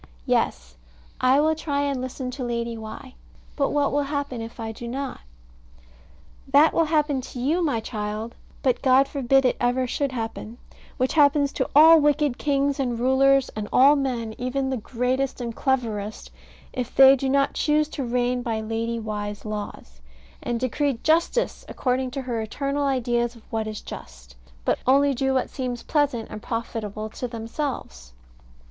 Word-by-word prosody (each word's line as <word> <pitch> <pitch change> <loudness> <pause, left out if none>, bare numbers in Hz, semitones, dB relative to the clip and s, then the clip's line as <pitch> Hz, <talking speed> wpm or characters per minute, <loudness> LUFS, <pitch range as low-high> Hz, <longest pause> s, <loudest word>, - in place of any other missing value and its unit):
Yes, - - -1 0.4
I 255 +2 +4
will 310 +1 +3
try 295 -2 -2
and 280 -3 -1
listen 255 0 -5
to 255 +1 -5
Lady 235 -1 -2
Why: 220 +3 -9 0.4
but 280 -2 +1
what 290 -1 +1
will 290 - +1
happen 285 -4 -3
if 225 +1 -9
I 225 -1 -4
do 235 +2 -8
not? 270 +3 -5 1.3
That 285 +4 +5
will 330 - +3
happen 300 -3 +1
to 250 - -8
you, 310 +8 +1
my 285 -8 +1
child 215 0 -4 0.3
but 255 -2 +1
God 265 0 +5
forbid 270 -1 +2
it 250 - +2
ever 250 +1 +1
should 275 +2 -1
happen 225 -1 -5 0.4
which 255 +1 0
happens 285 -2 +4
to - - -1 0.3
wicked 295 -2 +2
kings 280 -1 +1
and 245 -3 -1
rulers, 270 +2 +4
and 210 -1 -6
all 275 +3 +6
men, 245 -5 -2
even 265 +2 -1
the 260 - -1
greatest 250 +4 -1
and 235 -2 -4
cleverest, 220 -6 -2 0.4
if 250 -2 -4
they 270 0 +9
do 270 0 -2
not 275 +1 +2
choose 300 0 +2
to 280 - -4
reign 245 0 0
by 230 -2 -2
Lady 225 +1 -2
Why's 210 -1 -5
laws, 205 - -7 0.4
and 240 -1 -2
decree 255 +1 0
justice 335 +10 +1
according 255 0 -1
to 265 +1 -5
her 240 -3 -2
eternal 280 +5 -2
ideas 240 -2 0
of 230 - -16
what 220 -1 -1
is 215 -1 -5
just, - - -11 0.3
but - - +1
only 280 +2 +4
do 265 +1 0
what 260 - 0
seems 250 -3 -4
pleasant 285 -7 0
and 215 -1 -7
profitable 215 -2 -4
to 250 - -5
themselves. 225 - -5
255 Hz, 165 wpm, -24 LUFS, 230-275 Hz, 1.3 s, they